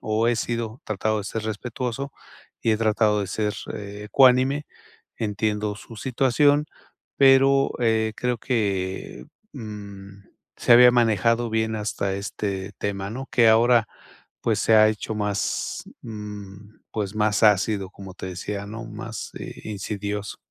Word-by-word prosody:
o 110 +2 +1
he 120 - +2
sido 115 0 -3
tratado 110 +1 -1
de 105 - -5
ser 110 +2 -4
respetuoso 120 +5 -4 0.5
y 115 - +2
he - - +2
tratado 110 -1 +2
de 100 - -2
ser 105 +2 -1 0.2
ecuánime. 125 +7 +2 0.5
Entiendo 105 -1 -1
su 115 +2 -12
situación, 135 +5 +2 0.5
pero, 135 0 +5
eh, 110 -2 +2
creo 125 -1 -1
que, 95 - -2 0.3
mm, 100 -4 -9 0.3
se - - +3
había 125 +1 +9
manejado 115 0 +2
bien 110 0 0
hasta 105 -2 -2
este 100 -1 -4
tema, 100 -1 -3
¿no?, 130 +4 -6
que 120 - +4
ahora, 115 +1 +5 0.6
pues, - - +1
se 110 - +4
ha 110 0 +7
hecho 110 0 -3
más, 105 -1 -2 0.2
mm, 105 -2 -9 0.2
pues, 105 -2 -3
más 105 -1 +1
ácido, 105 -2 +3
como 95 -2 -11
te 95 - -7
decía, 100 +3 -5
¿no?, 115 +3 -7
más 110 +1 -7
e - - -9
insidioso. 105 0 -4
110 Hz, 140 wpm, -24 LUFS, 100-115 Hz, 0.6 s, había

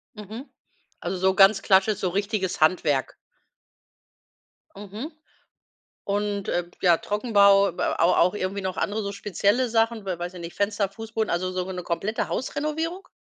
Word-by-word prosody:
Mhm. 220 +6 -9 0.5
Also 190 - -3
so 190 +1 +2
ganz 195 0 +5
klassisch, 195 +2 +3
so 185 - -1
richtiges 200 0 -2
Handwerk. 155 -4 +2 1.6
Mhm. 210 - -7 0.9
Und, 205 0 -2
äh, 175 - 0
b 175 - -21
ja, 175 -3 +5
Trockenbau, 200 -2 +3
b - - -3
a - - 0
aber 170 +2 +4
auch 180 +1 +4
irgendwie 200 0 -3
noch 190 -1 -4
andere 210 +1 -1
so 200 - -3
spezielle 205 +5 0
Sachen, 225 -1 +1
weil 185 -2 -3
weiß 175 +1 -5
ja 180 - -9
nicht, 170 0 -8
Fenster, 200 -1 0
Fußboden, 220 +1 -4
also 185 +2 -1
so 185 0 -2
ge 190 - -6
'ne 180 -1 -5
komplette 195 +6 -2
Hausrenovierung? 310 +7 -3
200 Hz, 165 wpm, -25 LUFS, 185-215 Hz, 1.6 s, ganz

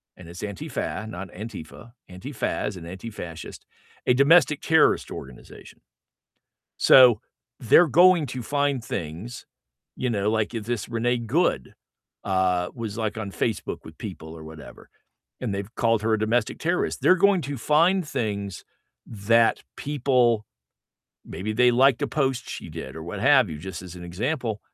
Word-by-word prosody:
and 90 - -13
it's 85 +1 -10
Antifa, 105 +1 -4
not 95 -2 -7
Antifa, 110 +2 -9 0.2
Antifa 115 +11 -9
as 105 - -3
an 85 - -9
anti-fascist, 90 -3 -8 0.4
a 125 - +4
domestic 150 +3 +4
terrorist 160 -1 +3
organization. 65 -2 -11 1.0
So 125 -5 +7 0.4
they're 160 +9 +5
going 175 +3 +5
to 130 0 -5
find 140 +1 -1
things, 95 +7 -6 0.5
you 125 - -2
know, 105 -2 0
like, 110 +1 -1
if 110 -2 -4
this 120 -3 -3
Renee 120 +2 0
Good, 120 - 0 0.5
uh, 90 -2 +1
was, 115 -3 -6
like, 110 -1 -2
on 100 -3 -5
Facebook 110 -2 -2
with - - -13
people 80 +1 -8
or 80 - -10
whatever, 80 -1 -12 0.5
and 120 -6 -3
they've 100 +3 -5
called 115 -2 +2
her 110 0 +2
a 110 - +1
domestic 110 +1 0
terrorist, 170 +2 -1
they're 185 - +5
going 195 0 +3
to 140 -1 -5
find 165 +7 +2
things 100 -7 -3 0.4
that 115 +2 +2
people 125 -6 +1 0.8
maybe 105 +3 -5
they 125 +2 +4
liked 130 +1 +4
a 145 - +2
post 135 -4 -1
she - - -7
did 65 - -8
or 80 - -7
what 95 +4 -6
have 130 -5 +4
you, 75 - -6
just 95 +3 -7
as 90 -2 -10
an 90 - -10
example, 110 - -3
115 Hz, 155 wpm, -25 LUFS, 95-130 Hz, 1.0 s, So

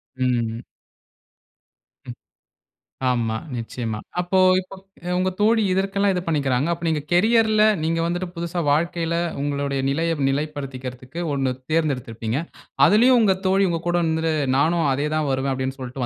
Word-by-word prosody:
ம், 130 - -2 0.3
ம். 115 +1 -6 1.4
ம். - - -8 1.0
ஆமா 115 -2 -1 0.2
நிச்சயமா. 115 -2 -4 0.2
அப்போ 185 +1 +1 0.2
இப்போ 185 - -12 0.4
உங்க 185 0 +1
தோழி 220 +1 +4
இதற்கெல்லாம் 195 +1 +1
இது 180 - -1
பண்ணிக்கிறாங்க. 140 -2 +1
அப்போ 170 0 -6
நீங்க 155 -2 0
கேரியர்ல 215 +3 +4 0.2
நீங்க 165 +1 0
வந்துட்டு 175 +1 -2
புதுசா 170 +1 -3
வாழ்க்கையில 170 +2 0 0.3
உங்களுடைய 140 -1 -1
நிலையை 165 +3 0
நிலைப்படுத்திக்கிறதுக்கு 135 -1 -5
ஒண்ணு 135 -2 0 0.2
தேர்ந்தெடுத்திருப்பீங்க. 125 -6 -1 0.5
அதிலேயும் 240 +4 +5
உங்க 195 -3 +3
தோழி 195 0 +3
உங்க 165 -1 -2
கூட 175 - +2
வந்து 160 0 0 0.2
நானும் 160 +1 +2
அதே 145 +3 -1
தான் 150 -2 0
வருவேன் 135 +1 0
அப்படின்னு 130 +1 -3
சொல்லிட்டு 125 0 -4
160 Hz, 135 wpm, -22 LUFS, 135-180 Hz, 1.4 s, அதிலேயும்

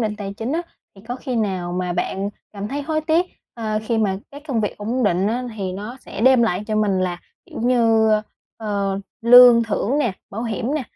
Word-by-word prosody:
định 215 -2 -1
tài 200 -1 -5
chính 225 +5 -4
á, 335 +2 0 0.3
thì 195 - -16
có 245 - -3
khi 255 -1 -4
nào 185 -5 -1
mà 180 0 -2
bạn 195 +3 -2 0.2
cảm 205 0 -5
thấy 285 +4 -3
hối 310 +2 -1
tiếc, 325 +3 +2 0.3
ờ, 215 -2 -2
khi 225 0 -1
mà 195 -3 +1
cái 285 - -10
công 235 -5 0
việc 210 - -2
ổn 230 +5 -2
định 185 -1 +2
á 240 +4 -1
thì 190 -3 -3
nó 210 +6 -6
sẽ - - -8
đem 255 0 +5
lại 200 -3 0
cho 215 -1 -1
mình 205 -3 +2
là 180 -1 -2 0.3
kiểu - - -8
như, 230 -2 +3
ơ, 215 - +3 0.4
ờ, 200 -3 -2 0.2
lương 245 0 +8
thưởng 230 +5 -1
nè, 240 -9 +1 0.2
bảo 220 +3 -4
hiểm 235 +4 -2
nè, 305 - -1
220 Hz, 225 wpm, -21 LUFS, 200-245 Hz, 0.4 s, lương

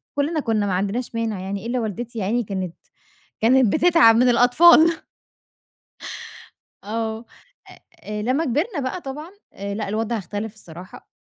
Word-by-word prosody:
كُلّنا 305 +3 0
كُنّا 220 -6 0
ما 190 - -1
عندناش 205 +6 -2
مانع 225 -4 -2
يعني، 195 +2 -5
إلا 245 +1 -1
والدتي 225 +1 -5
يا - - -2
عيني 235 +4 0
كانت 190 -4 -5 0.7
كانت 245 -1 +4
بتتعب 315 -10 +5
من 250 +2 +4
الأطفال. 320 +7 +5 1.8
آه. 220 +2 -4 0.8
آآ، 210 0 -5
لمّا 260 +8 0
كبرنا 300 - -1
بقى 300 +8 -4
طبعًا 300 +6 -8 0.2
آآ، 200 0 -5
لأ، 210 -2 -4
الوضع 225 +2 -1
اختلف 205 +3 -5
الصراحة. 180 -2 -13
230 Hz, 140 wpm, -22 LUFS, 205-260 Hz, 1.8 s, بتتعب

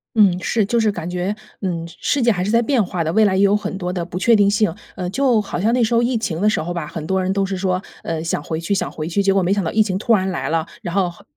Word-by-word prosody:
嗯， 195 -5 +4
是， 220 +1 +1
就 235 +4 +1
是 220 -2 +2
感 170 -4 -6
觉， 180 +3 -2 0.3
嗯， 170 -4 -3
世 285 - 0
界 235 - +4
还 180 -3 -1
是 200 - -2
在 230 +2 +4
变 240 -1 +2
化 175 -2 -2
的， 160 +1 -2
未 220 - +4
来 195 -3 +3
也 195 - +3
有 200 +1 +4
很 205 -1 -3
多 180 -1 -3
的 175 - -2
不 170 +1 -6
确 230 +5 +4
定 205 -2 +4
性。 210 -3 +2 0.2
呃， 180 -2 -4
就 255 -1 +2
好 205 - -5
像 220 +4 +2
那 245 -1 +3
时 230 +1 0
候 230 - +4
疫 240 0 +1
情 185 -6 -3
的 210 - +4
时 215 - 0
候 175 +3 -4
吧， 170 -4 -4
很 155 -1 -6
多 190 +3 0
人 185 +1 0
都 195 0 +1
是 195 0 -3
说， 185 0 -1 0.2
呃： 160 -1 -3
“想 165 -3 -1
回 160 +1 -3
去， 170 +5 -1
想 195 - -1
回 155 0 -5
去。” 190 +4 0
结 195 0 +3
果 195 -1 +2
没 185 - +2
想 200 -1 0
到 160 - -2
疫 220 - +4
情 195 -3 -3
突 225 +2 +3
然 190 -1 0
来 185 - -3
了， 160 0 0 0.2
然 175 +1 -5
后， 195 -2 +2
好 170 - -18
195 Hz, 350 characters per minute, -20 LUFS, 175-215 Hz, 0.3 s, 嗯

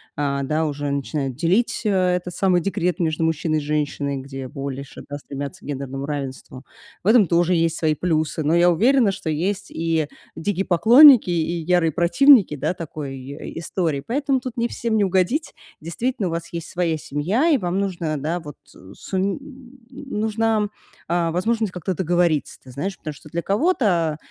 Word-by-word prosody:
а, 140 -1 -1
да, 155 +3 0
уже 145 -1 -3
начинают 140 -1 -2
делить 180 - +1
э - - +3 0.3
этот 180 -1 -7
самый 185 -2 +2
декрет 180 -1 -1
между 160 -2 0
мужчиной 160 0 0
и - - -1
женщиной, 145 -1 -2
где 135 0 -7
больше, 140 0 -7
да, 145 - -4
стремятся 145 +5 -7
к - - -13
гендерному 135 -1 -4
равенству. 135 -3 -6 0.4
В - - -5
этом 220 -1 +6
тоже 175 +1 +2
есть 165 -1 +1
свои 155 -2 +1
плюсы. 155 -1 -1
Но 150 +2 +1
я 175 +1 +5
уверена, 230 +5 +3
что 180 - -5
есть 185 +6 -2
и 160 -2 -1 0.3
дикие 195 +3 -2
поклонники, 235 - +7
и 170 0 0
ярые 175 -1 +2
противники, 195 - +5
да, 150 - -2
такой 150 -5 -6
и 140 +5 -8
истории. 160 -4 -2
Поэтому 275 +2 0
тут 255 -1 -7
не 235 -1 0
всем 230 -2 -2
не 210 - +3
угодить. 190 - 0 0.3
Действительно, 200 +6 -2
у - - -3
вас 165 +1 -5
есть 170 -1 -5
своя 170 -3 0
семья, 180 - 0
и 300 - +4
вам 180 -3 -2
нужно, 170 -6 -2
да, 160 +5 -2
вот, 150 -3 -10 0.2
э, 95 +1 -14
сум 195 +3 -2 0.5
нужна, 225 -5 -1 0.4
а, 170 -1 0
возможность 220 +4 0
как-то 180 +1 -3
договориться, 175 -3 0
ты 130 - -16
знаешь, 185 +9 -4
потому 155 - -6
что 145 +2 -15
для 170 +3 -3
кого-то, 195 - +1
170 Hz, 175 wpm, -22 LUFS, 150-200 Hz, 0.5 s, поклонники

